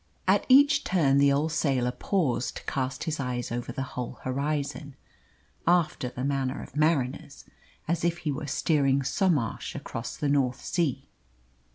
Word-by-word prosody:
At - - +3
each 285 +2 +6
turn 140 -7 +3
the 140 0 +5
old 150 +3 +1
sailor 130 -6 +1
paused 130 -6 -1
to - - -9
cast 130 -1 -2
his 155 -2 -3
eyes 125 -3 -3
over 120 0 -3
the 135 - -3
whole 125 0 -4
horizon, 140 +1 -2 0.7
after 170 -7 +2
the 125 +1 -6
manner 135 -1 -1
of - - -13
mariners, 145 -2 0 0.4
as 165 0 -1
if 170 0 +1
he 155 -3 -2
were 145 +1 -4
steering 140 -2 +2
Somarsh 150 - 0
across 115 - -6
the 145 - -1
North 135 -3 +1
Sea. 145 -6 -1
140 Hz, 155 wpm, -27 LUFS, 130-160 Hz, 0.7 s, each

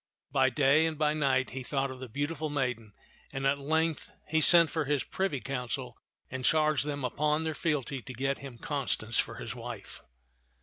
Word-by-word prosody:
By 130 -1 +4
day 140 +5 +4
and 160 -2 -3
by 150 0 +2
night 135 -4 +1
he 135 - -5
thought 135 +1 -1
of 130 - -9
the 130 -1 -7
beautiful 145 +5 -2
maiden, 125 -7 -2 0.4
and 135 0 -3
at 140 +1 +2
length 160 +1 0 0.2
he 160 +1 +2
sent 170 0 +7
for 160 -2 0
his 145 -1 +1
privy 190 -8 -1
council 125 -2 -3 0.4
and 130 0 -4
charged 155 0 +3
them 145 -3 -2
upon 150 +5 +1
their 160 0 -1
fealty 140 -4 -1
to 130 - -8
get 135 +3 -1
him 135 -4 -9
Constance 125 -5 -1
for - - 0
his - - -5
wife. - - -8
140 Hz, 185 wpm, -30 LUFS, 130-155 Hz, 0.4 s, sent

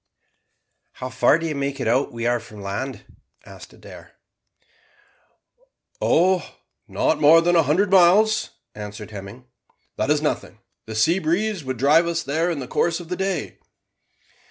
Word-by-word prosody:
"How 130 - -7
far 130 +4 +3
do 165 - -5
you 160 - -2
make 140 0 -3
it 130 - -2
out 125 +5 +1
we 115 0 -5
are 120 0 +1
from 110 -2 -14
the 100 - -10
land?" 100 +8 -5 0.4
asked - - -13
Adair. - - -14 1.9
"Oh, 185 +1 +1 0.3
not 155 -1 0
more 155 +3 +7
than 175 +1 +2
a 165 - +6
hundred 180 +7 +1
miles," 195 +4 +4 0.2
answered 105 +1 -9
Hemming. 105 +5 -10 0.5
"That - - -1
is - - +3
nothing. - - -3 0.3
The 110 - -7
sea 165 - +2
breeze 190 +3 -1
would 130 -1 -4
drive 150 +7 +4
us 170 -1 -2
in 140 - -4
there 165 +3 +1
in 170 - -2
the 130 -3 -6
course 170 +5 0
of 170 -2 -11
the 180 - -2
day." 190 +1 -3
150 Hz, 165 wpm, -22 LUFS, 120-175 Hz, 1.9 s, more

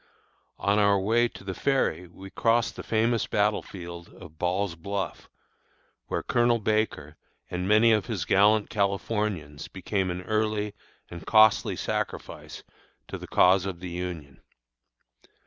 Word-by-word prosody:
On 100 +1 +1
our 100 -1 +4
way 115 +5 +2
to 115 - -13
the 95 -1 -4
ferry 90 - 0
we 95 +3 -12
crossed 115 0 +1
the - - -6
famous 115 +1 0
battle 105 0 +1
field 85 -2 -9
of 80 -4 -14
Ball's 90 +1 0
Bluff, 95 -1 -5 0.8
where - - -2
Colonel 120 -1 +2
Baker 105 -9 -1 0.3
and 90 +1 -2
many 110 +3 +5
of 110 -2 +2
his 100 -8 -3
gallant 105 +3 +3
Californians 100 -6 -2
became 95 0 -2
an 90 +1 -4
early 105 0 -1 0.4
and 85 - -8
costly 110 -1 +5
sacrifice - - -5 0.5
to - - -5
the - - -9
cause 95 +1 +4
of 90 -3 -5
the 90 0 -6
Union. 85 -6 -6
100 Hz, 140 wpm, -27 LUFS, 90-110 Hz, 0.8 s, many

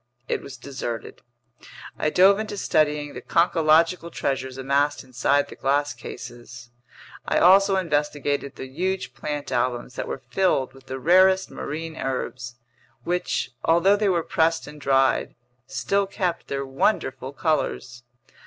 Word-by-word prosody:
It - - -1
was 135 - -10
deserted. 120 -3 -6 0.8
I 155 - +1
dove 195 +5 +5
into 215 -1 -4
studying 150 -5 +1
the - - -7
conchological 165 0 +3
treasures 130 -1 -3
amassed 140 +3 0
inside 135 +3 +1
the - - -11
glass 145 +1 0
cases. 120 0 -10 0.6
I - - +1
also 195 +2 +6
investigated 145 -5 -1
the - - -7
huge 155 -1 -3
plant 145 +1 -5
albums 125 0 -1
that - - -3
were 135 - -5
filled 135 -7 +1
with 135 0 -18
the 130 - -4
rarest 185 +6 +4
marine 160 +2 -6
herbs, 125 -2 -4 0.5
which, 175 -7 -1
although 170 +5 +4
they 205 -1 +1
were 170 -3 +1
pressed 165 +1 +1
and 150 0 -11
dried, 135 -1 +2 0.3
still 195 +9 0
kept 185 -3 -2
their 140 0 -3
wonderful 135 -1 -1
colors. 140 -5 -2
145 Hz, 135 wpm, -24 LUFS, 130-170 Hz, 0.8 s, also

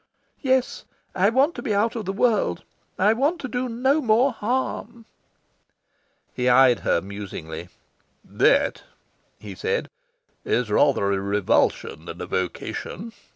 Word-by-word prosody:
"Yes. 260 -2 0 0.3
I 190 +2 +3
want 270 +8 +3
to - - -7
be 220 -7 -1
out 225 +4 +1
of 220 -3 -4
the 190 - -1
world. 205 - +1 0.3
I 205 +4 +4
want 290 +9 0
to 260 - -4
do 250 0 -3
no 260 +6 +1
more 245 +2 +3
harm." 240 0 -3 1.3
He 125 0 0
eyed 125 -1 +5
her 85 - +1
musingly. 90 -4 -7 0.6
"That," - - +2 0.6
he 105 -2 -8
said, 90 - -2 0.6
"is 120 -3 0
rather 105 -4 +3
a 100 - 0
revulsion 100 -5 0
than 85 0 -8
a - - -4
vocation. 180 - -4
205 Hz, 135 wpm, -24 LUFS, -, 1.3 s, eyed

